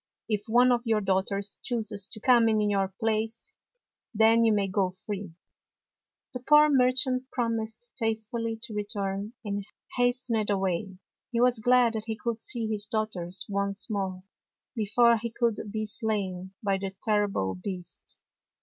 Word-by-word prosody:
If 210 -2 -1
one 245 +3 +5
of 240 -1 +2
your 225 -3 +2
daughters 195 +1 -1
chooses 220 -5 -2
to - - -8
come 235 -1 +5
in 215 -1 +2
your 195 -1 +1
place, 225 +1 -2 0.6
then 225 +2 +5
you 225 - +4
may 205 -2 +2
go 190 -1 +1
free." 190 -1 -7 1.0
The 250 - -4
poor 300 +4 +6
merchant 255 0 +3
promised 230 -1 -2
faithfully 225 0 -2
to 230 -2 -7
return, 205 0 -3
and 205 -1 -2 0.3
hastened 245 -3 +1
away. 190 -1 -1 0.3
He 235 - 0
was 245 -1 +3
glad 245 0 +4
that 220 -1 -4
he 220 -1 -3
could 235 -2 -3
see 235 -2 +1
his 210 -1 -2
daughters 200 -5 -3
once 200 +2 -2
more, 190 -3 -3 0.5
before 235 +2 +4
he 230 +1 -4
should 225 -3 0
be 215 0 -2
slain 195 -3 -2
by 195 -1 +1
the 195 0 -5
terrible 205 - +1
beast. 175 - -7
215 Hz, 150 wpm, -28 LUFS, 200-235 Hz, 1.0 s, poor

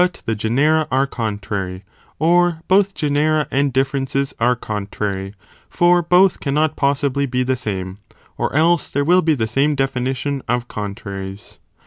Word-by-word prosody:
the 115 - 0
genera 145 +9 +1
are 135 +1 +2
contrary, 100 -6 -4 0.3
or 175 0 +2
both 195 +1 +3
genera 150 0 +1
and 140 0 +1
differences 135 +1 -1
are 120 +2 +3
contrary, 100 -3 -4 0.3
for 175 0 +3
both 180 +2 +4
cannot 150 +2 0
possibly 140 0 0
be 125 0 0
the 130 +1 0
same, 95 -5 -5 0.4
or - - -2
else 170 +3 +3
there 145 0 -1
will 180 +3 +5
be 160 -2 +2
the 115 -4 -1
same 135 +7 +1
definition 135 +1 -2
of 120 0 -1
contraries. 100 -2 -7
135 Hz, 140 wpm, -19 LUFS, 110-155 Hz, 0.4 s, will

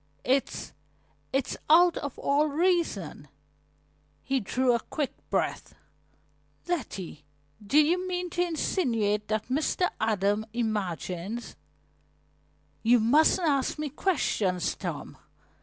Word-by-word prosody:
It's 265 +1 0 0.6
it's 270 -1 -1
out 345 +2 +6
of 285 - -5
all 290 +2 +2
reason." 300 - 0 1.0
He 270 0 0
drew 250 +4 +1
a 235 - +2
quick 280 +3 -3 0.2
breath. - - -2 0.9
"Letty, 200 - -4 0.4
do 235 +9 +1
you 345 +5 +4
mean 360 -1 -3
to 350 - -1
insinuate 230 - 0
that 215 +2 -2
Mr. 310 +6 +1
Adams 210 0 +1
imagines 210 -1 -3 0.7
" - - -39
"You 245 - +7
mustn't 310 +9 +4
ask 275 -1 +1
me 300 -1 -3
questions, 215 - 0
Tom. - - -6
260 Hz, 110 wpm, -28 LUFS, 210-315 Hz, 1.0 s, You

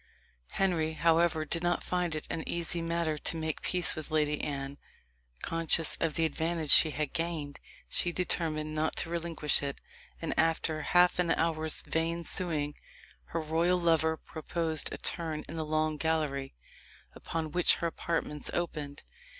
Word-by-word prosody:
Henry, 165 -5 +1
however, 165 0 +2
did 165 +2 -1
not 175 0 0
find 180 -3 -1
it 155 - -4
an 160 - -3
easy 170 0 -1
matter 165 -2 -1
to 165 - -1
make 160 -1 -3
peace 180 -2 +2
with 155 - -5
the 155 - -3
Lady 150 -1 +1
Anne. 140 -1 -4 0.6
Conscious 165 -1 +1
of 165 -2 0
the 165 - +2
advantage 160 0 -1
she 160 - +8
had 150 -1 -3
gained, 165 -4 -3 0.3
she 175 - +2
determined 160 -3 -1
not 155 +1 0
to 165 - 0
relinquish 165 -3 +3
it, 140 -1 -4 0.4
and, - - -2
after 160 -1 +1
half 180 +3 +4
an 175 -1 +2
hour's 160 -1 +2
vain 165 +1 -1
suing, 155 -5 -1 0.5
her 165 - -3
royal 165 +3 +1
lover 160 -2 +2
proposed 160 0 -2
a - - -5
turn 160 -3 -1
in 160 - -7
the 160 - -2
long 155 0 0
gallery, 150 - -1 0.6
upon 160 -2 -4
which 175 +2 +4
her - - -4
apartments 165 -3 -2
opened. 150 -5 -4
160 Hz, 160 wpm, -30 LUFS, 155-170 Hz, 0.6 s, she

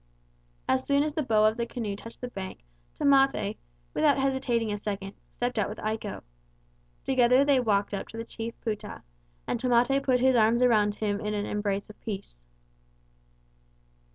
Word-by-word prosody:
As 260 0 +2
soon 280 0 +2
as 300 -1 -2
the 315 - -1
bow 220 -5 +3
of 215 +2 +2
the 235 0 -2
canoe 220 -5 -4
touched 230 +3 -11
the 250 - -3
bank, 190 - -7 0.3
Tamate, 270 -7 +3 0.4
without 295 -3 +3
hesitating 260 -5 0
a - - -2
second, 200 -1 -4 0.2
stepped 245 -1 -2
out 200 - 0
with 210 - -7
Iko. 215 -1 -4 0.8
Together 255 +1 +4
they 280 -2 +4
walked 205 -4 +1
up 200 - -3
to 225 - -10
the 230 - -4
chief 230 0 -6
Pouta, 215 -3 -5 0.4
and - - -2
Tamate 250 +2 +3
put 255 -2 +2
his 260 +1 +4
arms 230 +2 +4
around 210 -4 +3
him 205 -2 -1
in 210 0 -2
an 205 0 -2
embrace 205 -1 -2
of - - -21
peace. 190 - -6
230 Hz, 170 wpm, -28 LUFS, 210-255 Hz, 0.8 s, Together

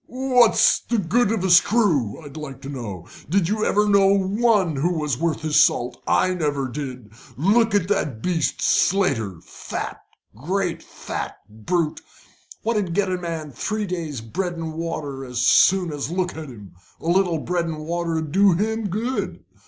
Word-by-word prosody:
"What's 250 -2 +4
the 235 - -2
good 210 +4 +2
of 220 -5 -1
a 190 - +1
screw, 175 - +3
I'd 140 0 -11
like 145 -4 -7
to 135 - -6
know? 105 - -6 0.2
Did 185 0 +2
you 215 +3 -1
ever 210 0 +2
know 200 -1 +5
one 195 - +1
what 175 +3 +1
was 150 -5 -2
worth 165 -1 -1
his 155 -2 +1
salt? 120 +1 +2
I 185 - +3
never 145 -6 -1
did. 130 -5 -7 0.3
Look 215 - +3
at 190 -4 +2
that 150 - -1
beast, 170 -3 -1
Slater, 120 - +1 1.0
great 175 - -2
fat - - -6
brute, 150 - -2 0.6
what'd 210 -7 -1
get 195 -2 +1
a 185 - 0
man 165 -4 -5
three 215 - -3
days' 165 - -4
bread 175 - -3
and 165 -2 -5
water 155 -4 -4
as 125 -2 -7
soon 180 -4 +4
as 145 -1 -4
look 180 0 -1
at 155 -2 -7
him. 105 -7 -12 0.3
A - - -13
little 175 -1 +2
bread 175 +2 -1
and 155 -2 -5
water'd 165 -2 -2
do 195 +2 +5
him 220 +4 -1
good. 225 +7 -3
170 Hz, 165 wpm, -22 LUFS, 145-195 Hz, 1.0 s, know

